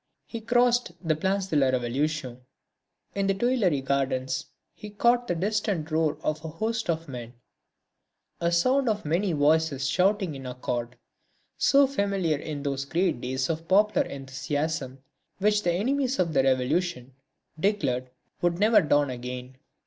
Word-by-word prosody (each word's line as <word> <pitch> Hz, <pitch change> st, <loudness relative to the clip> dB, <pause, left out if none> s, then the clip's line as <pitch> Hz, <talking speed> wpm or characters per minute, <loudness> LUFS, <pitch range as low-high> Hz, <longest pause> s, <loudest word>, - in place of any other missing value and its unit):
He 230 Hz, -, -7 dB
crossed 245 Hz, -3 st, +2 dB
the 155 Hz, -, +3 dB
Place 190 Hz, +4 st, 0 dB
de 190 Hz, -, -3 dB
la 135 Hz, -2 st, +4 dB
Révolution. 130 Hz, +1 st, -1 dB, 0.7 s
In 200 Hz, -1 st, 0 dB
the 195 Hz, -, +2 dB
Tuileries 195 Hz, -, +1 dB
gardens 130 Hz, -1 st, -1 dB, 0.3 s
he 210 Hz, -, -10 dB
caught 240 Hz, +4 st, +2 dB
the 175 Hz, -, 0 dB
distant 195 Hz, -3 st, -1 dB
roar 155 Hz, -1 st, +1 dB
of 155 Hz, 0 st, -2 dB
a -, -, -4 dB
host 220 Hz, +7 st, -3 dB
of 165 Hz, 0 st, -1 dB
men, 120 Hz, -3 st, -7 dB, 1.1 s
a 170 Hz, 0 st, +1 dB
sound 255 Hz, +9 st, +3 dB
of 210 Hz, -4 st, -2 dB
many 175 Hz, +6 st, +1 dB
voices 150 Hz, -2 st, +2 dB
shouting 190 Hz, +4 st, +1 dB
in 135 Hz, -2 st, -7 dB
accord, 125 Hz, -1 st, -4 dB, 0.6 s
so 280 Hz, 0 st, +5 dB
familiar 200 Hz, -, 0 dB
in 150 Hz, -2 st, -5 dB
those 140 Hz, -1 st, -2 dB
great 165 Hz, -4 st, 0 dB
days 130 Hz, +1 st, -1 dB
of 165 Hz, 0 st, -3 dB
popular 210 Hz, +3 st, +3 dB
enthusiasm 135 Hz, 0 st, -4 dB, 0.3 s
which 210 Hz, +1 st, +2 dB
the 175 Hz, -, +1 dB
enemies 260 Hz, +8 st, 0 dB
of 170 Hz, -3 st, 0 dB
the 135 Hz, -, +4 dB
Revolution 135 Hz, +1 st, 0 dB, 0.5 s
declared 140 Hz, -10 st, 0 dB, 0.3 s
would 175 Hz, -1 st, +1 dB
never 215 Hz, +3 st, +5 dB
dawn 145 Hz, -3 st, +2 dB
again. 125 Hz, +1 st, -7 dB
160 Hz, 150 wpm, -27 LUFS, 135-200 Hz, 1.1 s, so